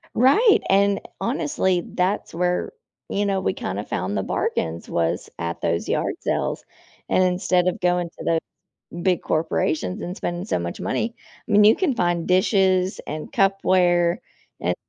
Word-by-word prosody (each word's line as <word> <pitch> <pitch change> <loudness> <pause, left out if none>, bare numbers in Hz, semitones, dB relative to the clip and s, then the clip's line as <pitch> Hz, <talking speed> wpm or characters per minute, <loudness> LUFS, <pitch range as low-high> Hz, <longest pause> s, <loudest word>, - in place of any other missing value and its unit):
Right 415 - +5
and 200 +1 +3 0.2
honestly, 230 - 0
that's 185 +1 -1
where, 180 +1 0 0.4
you 205 +1 0
know, 195 -1 0
we - - +1
kinda 100 +2 -4
found 100 0 -3
the 95 - 0
bargains 80 +1 -2
was 85 +1 -1
at 85 0 -4
those 85 0 -1
yard - - 0
sales - - -1 0.5
and - - +3
instead 180 0 +2
of 180 - -1
going 175 -1 +1
to - - -11
the 165 -1 +2 0.6
big 185 -3 +1
corporations 155 - -1
and 180 - -4
spending 175 +1 -3
so 210 - -1
much 85 0 -5
money 230 +1 -2 0.3
I - - -2
mean, 205 0 +6
you 220 - +7
can 325 -10 0
find 175 -3 0
dishes 185 0 +2
and 155 +1 -6
cupware 180 -3 +3 0.4
and - - 0
180 Hz, 155 wpm, -23 LUFS, 165-195 Hz, 0.6 s, you